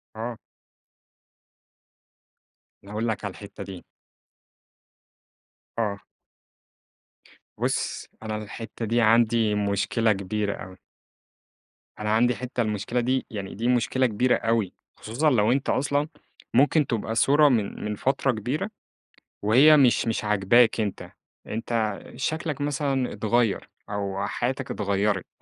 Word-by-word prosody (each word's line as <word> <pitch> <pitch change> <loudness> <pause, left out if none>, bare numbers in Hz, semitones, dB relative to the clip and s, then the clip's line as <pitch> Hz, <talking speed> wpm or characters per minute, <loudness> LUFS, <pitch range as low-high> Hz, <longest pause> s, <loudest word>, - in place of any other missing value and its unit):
آه. 115 +1 -4 2.5
أنا 100 - -12
هاقول 110 +2 -2
لك 110 -1 -2
على 100 - -3
الحتة 100 +1 -9
دي. 95 -2 -9 2.0
آه. 100 -3 -1 1.6
بُص - - -2 0.2
أنا 110 -1 -3
الحتة 110 +2 -6
دي 115 +2 +2
عندي 115 -1 +4
مشكلة 105 +2 +1
كبيرة 100 +1 -2
أوي. 95 -1 -10 1.2
أنا 105 0 -2
عندي 120 +1 +3
حتّة 125 +1 -3
المشكلة 105 +3 -1
دي 130 +2 0
يعني 100 -3 -6
دي 115 +4 -2
مشكلة 125 +1 +2
كبيرة 125 +2 +2
أوي، 115 -4 0 0.3
خصوصًا 125 +8 +1
لو 110 -4 +3
أنت 135 +2 0
أصلًا 145 +3 +1 0.5
ممكن 145 +3 +4
تبقى 115 -1 -2
صورة 145 +5 +5
من 110 -6 -1
من 105 0 -2
فترة 135 +3 +1
كبيرة 130 - -3 0.7
وهي 130 +9 +7
مش 130 -5 +4
مش 110 -1 -1
عاجباك 105 +3 +4
أنت، 105 -3 -3 0.4
أنت 110 -2 -2 0.2
شكلك 155 +2 -2
مثلًا 140 -3 -1
اتغيّر 115 -1 0 0.2
أو 100 -1 -2
حياتك 130 +1 -2
اتغيّرت 100 -1 0
115 Hz, 115 wpm, -25 LUFS, 105-125 Hz, 2.5 s, وهي